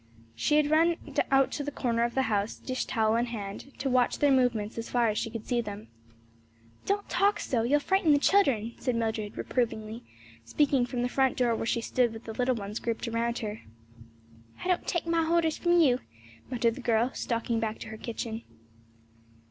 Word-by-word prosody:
She 295 Hz, -, +1 dB
had 300 Hz, 0 st, +3 dB
run 330 Hz, +2 st, +4 dB, 0.3 s
out 270 Hz, 0 st, +4 dB
to 290 Hz, -, -3 dB
the 290 Hz, -, -3 dB
corner 240 Hz, -4 st, -1 dB
of 235 Hz, 0 st, -1 dB
the 265 Hz, -, +3 dB
house, 210 Hz, -2 st, 0 dB
dishtowel 225 Hz, -4 st, 0 dB
in 240 Hz, -, 0 dB
hand, 210 Hz, +3 st, -6 dB
to 270 Hz, -, -3 dB
watch 250 Hz, -2 st, +2 dB
their 290 Hz, -1 st, +3 dB
movements 235 Hz, -5 st, +1 dB
as 230 Hz, -, -6 dB
far 240 Hz, -2 st, +2 dB
as 210 Hz, -, -2 dB
she -, -, -2 dB
could 225 Hz, -1 st, -7 dB
see 245 Hz, -2 st, +1 dB
them. 210 Hz, -1 st, -8 dB, 1.0 s
"Don't 405 Hz, +1 st, 0 dB
talk 400 Hz, +3 st, +2 dB
so; 240 Hz, -4 st, 0 dB
you'll 285 Hz, +6 st, +2 dB
frighten 385 Hz, -1 st, +2 dB
the 290 Hz, -, +6 dB
children," 275 Hz, -, +2 dB
said 250 Hz, -3 st, -1 dB
Mildred, 220 Hz, -2 st, -2 dB
reprovingly, 225 Hz, -2 st, -2 dB, 0.4 s
speaking 270 Hz, -, +2 dB
from 245 Hz, -1 st, -2 dB
the -, -, +1 dB
front 265 Hz, +1 st, +1 dB
door 240 Hz, -2 st, +2 dB
where 225 Hz, -, -3 dB
she 235 Hz, -, +1 dB
stood 240 Hz, 0 st, +1 dB
with 225 Hz, +1 st, -9 dB
the 225 Hz, -, -7 dB
little 250 Hz, +2 st, +1 dB
ones 210 Hz, -1 st, -5 dB
grouped 230 Hz, 0 st, -3 dB
about 235 Hz, +1 st, -1 dB
her. 210 Hz, +1 st, -5 dB, 1.0 s
"I -, -, -3 dB
don't 360 Hz, -1 st, 0 dB
take 345 Hz, -2 st, -1 dB
my 335 Hz, 0 st, +2 dB
horders 325 Hz, -1 st, +1 dB
from 345 Hz, 0 st, +3 dB
you," 260 Hz, -6 st, +4 dB, 0.5 s
muttered 235 Hz, -2 st, +1 dB
the 270 Hz, -, -8 dB
girl, 235 Hz, +1 st, +2 dB
stalking 230 Hz, -1 st, -1 dB
back 220 Hz, -1 st, -2 dB
to -, -, -7 dB
her 220 Hz, -, -7 dB
kitchen. 225 Hz, 0 st, -5 dB
240 Hz, 195 wpm, -28 LUFS, 225-280 Hz, 1.0 s, the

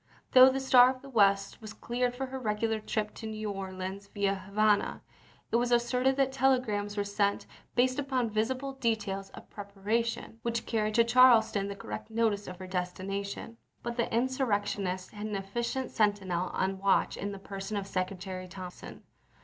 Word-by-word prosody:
Though 255 Hz, 0 st, +9 dB
the 265 Hz, +1 st, -1 dB
Star 255 Hz, -2 st, +7 dB
of 255 Hz, 0 st, -5 dB
the 275 Hz, -, -11 dB
West 200 Hz, -3 st, +3 dB
was 215 Hz, -1 st, -8 dB
cleared 245 Hz, +2 st, -2 dB
for 265 Hz, +1 st, -3 dB
her 265 Hz, 0 st, -6 dB
regular 220 Hz, -1 st, -1 dB
trip 210 Hz, 0 st, -2 dB
to 220 Hz, -, -7 dB
New 215 Hz, -1 st, -4 dB
Orleans 190 Hz, 0 st, -6 dB
via 200 Hz, -1 st, 0 dB
Havana, 205 Hz, +2 st, +1 dB, 0.5 s
it 230 Hz, -, +4 dB
was 240 Hz, +1 st, 0 dB
asserted 250 Hz, +2 st, +2 dB
that 270 Hz, -1 st, +2 dB
telegrams 250 Hz, -6 st, +1 dB
were 205 Hz, -, +1 dB
sent 200 Hz, 0 st, 0 dB, 0.3 s
based 255 Hz, +2 st, +2 dB
upon 260 Hz, -5 st, -1 dB
visible 255 Hz, +6 st, -1 dB
details 205 Hz, -6 st, -2 dB
of -, -, -12 dB
preparation, 210 Hz, +3 st, -2 dB
New -, -, -10 dB
York 225 Hz, -, -23 dB
which 235 Hz, -1 st, -2 dB
carried 215 Hz, -2 st, 0 dB
to 230 Hz, -, +6 dB
Charleston 230 Hz, -4 st, +5 dB
the 200 Hz, -, -5 dB
correct 105 Hz, -, -7 dB
notice 220 Hz, -2 st, 0 dB
of 185 Hz, -, -7 dB
jan.iojmi. -, -, -24 dB
her 185 Hz, -, -6 dB
destination. 195 Hz, +4 st, -4 dB, 0.3 s
But 235 Hz, 0 st, -3 dB
the 235 Hz, -1 st, -1 dB
insurrectionists 205 Hz, -7 st, -1 dB
had 210 Hz, 0 st, -6 dB
an 210 Hz, -, -3 dB
efficient 235 Hz, +6 st, -3 dB
sentinel 190 Hz, -4 st, +1 dB
on 190 Hz, 0 st, -1 dB
watch 195 Hz, 0 st, +2 dB
in 200 Hz, -, -4 dB
the 200 Hz, -, -6 dB
person 195 Hz, +1 st, -5 dB
of 200 Hz, -, -3 dB
Secre 185 Hz, -1 st, -3 dB
tary 185 Hz, 0 st, -6 dB
Thompson. 180 Hz, -1 st, -9 dB
215 Hz, 180 wpm, -30 LUFS, 195-240 Hz, 0.5 s, Though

